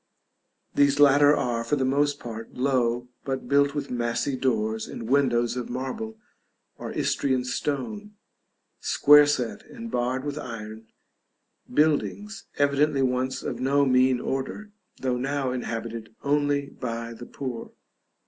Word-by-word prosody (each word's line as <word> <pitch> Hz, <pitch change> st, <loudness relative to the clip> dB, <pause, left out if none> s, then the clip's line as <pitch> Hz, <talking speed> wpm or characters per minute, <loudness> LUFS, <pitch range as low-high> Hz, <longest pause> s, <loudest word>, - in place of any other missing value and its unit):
These 140 Hz, 0 st, +3 dB
latter 145 Hz, +1 st, +6 dB
are, 120 Hz, -2 st, -1 dB
for 115 Hz, +5 st, 0 dB
the 135 Hz, -2 st, 0 dB
most 145 Hz, +2 st, +1 dB
part, 115 Hz, -1 st, -8 dB
low, 125 Hz, -2 st, 0 dB
but 135 Hz, -1 st, -3 dB
built 140 Hz, 0 st, +3 dB
with 145 Hz, -, -3 dB
massy 120 Hz, +3 st, -1 dB
doors 110 Hz, -4 st, 0 dB
and 115 Hz, -, -7 dB
windows 120 Hz, -3 st, +2 dB
of 125 Hz, -1 st, -4 dB
marble 125 Hz, -3 st, -4 dB, 0.6 s
or -, -, -5 dB
Istrian 130 Hz, -2 st, 0 dB
stone, 205 Hz, +12 st, -3 dB, 0.6 s
square 150 Hz, 0 st, +6 dB
set 125 Hz, -5 st, -1 dB
and 230 Hz, -1 st, -8 dB
barred 125 Hz, +2 st, -1 dB
with 145 Hz, +1 st, -3 dB
iron; 110 Hz, -4 st, -8 dB, 0.8 s
buildings 155 Hz, -, 0 dB
evidently 145 Hz, 0 st, +2 dB
once 130 Hz, 0 st, -1 dB
of -, -, -4 dB
no 140 Hz, +2 st, +3 dB
mean 130 Hz, -1 st, +4 dB
order, 135 Hz, +13 st, -4 dB, 0.3 s
though 125 Hz, -1 st, 0 dB
now 135 Hz, 0 st, -1 dB
inhabited 115 Hz, -2 st, -5 dB
only 145 Hz, 0 st, +1 dB
by 115 Hz, -2 st, -5 dB
the 120 Hz, +1 st, -10 dB
poor. 130 Hz, -4 st, -6 dB
130 Hz, 130 wpm, -26 LUFS, 120-145 Hz, 0.8 s, latter